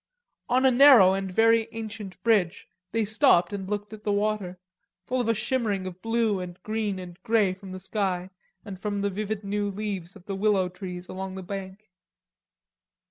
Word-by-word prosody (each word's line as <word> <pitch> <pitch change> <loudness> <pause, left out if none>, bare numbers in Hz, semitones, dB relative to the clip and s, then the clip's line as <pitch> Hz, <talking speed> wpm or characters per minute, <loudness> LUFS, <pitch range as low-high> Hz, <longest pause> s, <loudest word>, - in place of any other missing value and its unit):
On 255 +2 +3
a 260 - +6
narrow 245 -8 +8
and 195 -1 -3
very 225 +2 +4
ancient 215 -3 -7
bridge 205 -5 +2 0.2
they 225 -1 +1
stopped 205 -5 +3
and 195 -1 -5
looked 205 0 -3
at 215 -1 -10
the 210 - 0
water, 205 -3 -1 0.5
full 255 +2 0
of 235 - -2
a 230 - +2
shimmer 235 -2 0
of 185 -2 -5
blue 225 -3 +1
and 180 -1 -7
green 215 -2 -2
and 180 0 -9
grey 215 -4 +2
from 190 0 -11
the 185 - -6
sky 190 -2 -2 0.3
and 195 -3 -8
from 205 0 -2
the 200 0 0
vivid 210 +1 -3
new 205 +1 -1
leaves 195 -3 -5
of 190 -3 -15
the 200 - -4
willow 195 -2 +2
trees 180 -1 -7
along 190 0 -6
the 190 - -6
bank. 195 +2 -7
200 Hz, 185 wpm, -26 LUFS, 185-220 Hz, 0.5 s, narrow